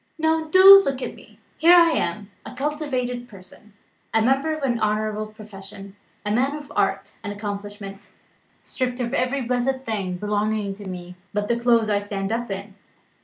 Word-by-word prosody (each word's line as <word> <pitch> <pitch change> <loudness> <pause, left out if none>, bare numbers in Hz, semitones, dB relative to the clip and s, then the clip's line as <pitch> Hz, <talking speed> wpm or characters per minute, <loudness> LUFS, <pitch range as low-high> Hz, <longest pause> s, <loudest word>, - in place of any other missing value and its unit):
Now 320 0 +1
do 380 +4 +9
look 275 -5 -2
at - - -4
me. - - -17 0.2
Here 340 +2 +7
I 340 -1 +6
am, 210 -9 -2
a - - -10
cultivated 255 -4 -3
person, 195 +1 -15 0.4
a - - +5
member 270 +5 +2
of 310 -2 -4
an 240 -3 0
honourable 215 0 -1
profession, 200 -2 -11 0.3
a 210 - -1
man 260 +6 +1
of 295 -1 -9
art - - 0
and 205 - -4
accomplishment 205 -1 -7 0.5
stripped 250 -1 -3
of 240 0 -2
every 275 0 0
blessed 250 +2 -1
thing 195 -5 -3
belonging 210 0 -1
to 200 0 -10
me 180 0 -8 0.2
but 205 0 -1
the 235 +1 0
clothes 235 -2 +3
I 205 - +2
stand 200 0 -4
up 235 +1 -2
in. 195 +1 -6
220 Hz, 170 wpm, -23 LUFS, 205-265 Hz, 0.5 s, do